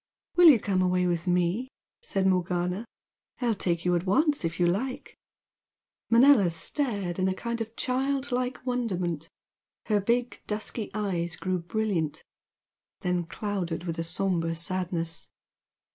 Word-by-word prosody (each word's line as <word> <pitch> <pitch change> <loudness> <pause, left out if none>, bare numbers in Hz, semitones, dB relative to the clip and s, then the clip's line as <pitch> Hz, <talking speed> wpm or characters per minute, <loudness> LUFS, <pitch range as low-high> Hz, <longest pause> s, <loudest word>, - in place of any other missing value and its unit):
"Will 350 -2 +9
you 260 -7 +7
come 195 -2 0
away 180 0 +2
with 175 0 -1
me?" 180 +8 +1 0.3
said 195 - -1
Morgana 180 +2 0 0.5
"I'll 240 -3 +1
take 175 -4 -1
you 180 - +3
at 175 +2 -1
once 290 - +3
if 165 +1 -2
you 175 - +4
like!" 220 +10 -2 0.9
Manella 235 -5 +6
stared 195 - -2
in 185 - +2
a 190 - 0
kind 235 +2 -3
of 225 +1 -5
child 270 +2 -1
like 250 0 -2
wonderment, 180 - -2 0.6
her 210 -2 +2
big 240 +4 0
dusky 215 +1 -3
eyes 175 -6 -1
grew 185 +2 -1
brilliant, 175 -4 -2 0.8
then 180 -1 0
clouded 180 -5 -3
with 165 -2 -4
a - - 0
sombre 165 -1 0
sadness. 170 -1 -1
190 Hz, 140 wpm, -28 LUFS, 175-235 Hz, 0.9 s, Will